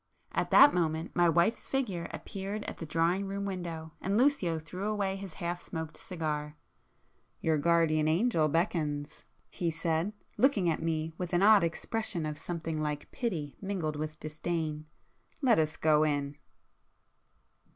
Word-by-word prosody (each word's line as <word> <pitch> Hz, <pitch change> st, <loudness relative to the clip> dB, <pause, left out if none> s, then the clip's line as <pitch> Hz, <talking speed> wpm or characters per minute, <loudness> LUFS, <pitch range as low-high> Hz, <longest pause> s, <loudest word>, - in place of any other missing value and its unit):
At -, -, -1 dB
that 285 Hz, -, +8 dB
moment 160 Hz, -1 st, -1 dB
my 175 Hz, -1 st, +5 dB
wife's 170 Hz, +7 st, +2 dB
figure 210 Hz, -11 st, -1 dB
appeared 200 Hz, +2 st, -5 dB
at -, -, -6 dB
the 165 Hz, -, -6 dB
drawing 170 Hz, +5 st, +1 dB
room 200 Hz, +1 st, -3 dB
window, 170 Hz, -4 st, -5 dB
and 195 Hz, +2 st, 0 dB
Lucio 235 Hz, -, +3 dB
threw 180 Hz, +6 st, -5 dB
away 200 Hz, -2 st, 0 dB
his 195 Hz, -4 st, -8 dB
half 175 Hz, 0 st, -3 dB
smoked 160 Hz, -2 st, -6 dB
cigar. 150 Hz, -4 st, -4 dB, 0.8 s
"Your 160 Hz, -2 st, +1 dB
guardian 155 Hz, -1 st, +3 dB
angel 165 Hz, -1 st, +3 dB
beckons!" 150 Hz, -3 st, -1 dB, 0.3 s
he 170 Hz, -, -1 dB
said, 165 Hz, +4 st, -1 dB, 0.2 s
looking 235 Hz, -9 st, +3 dB
at 160 Hz, -1 st, +1 dB
me 160 Hz, 0 st, -1 dB, 0.2 s
an 175 Hz, +1 st, +3 dB
odd 210 Hz, -2 st, +7 dB
expression 175 Hz, +1 st, -2 dB
of 150 Hz, -1 st, -4 dB
something 165 Hz, -1 st, -3 dB
like 150 Hz, -1 st, -3 dB
pity 170 Hz, -, -3 dB
mingled 185 Hz, -6 st, -2 dB
with 155 Hz, +1 st, -5 dB
disdain,—"Let 155 Hz, -, -2 dB
us 155 Hz, 0 st, 0 dB
go 155 Hz, -1 st, +4 dB
in." 145 Hz, -2 st, 0 dB
165 Hz, 140 wpm, -31 LUFS, 155-195 Hz, 0.8 s, that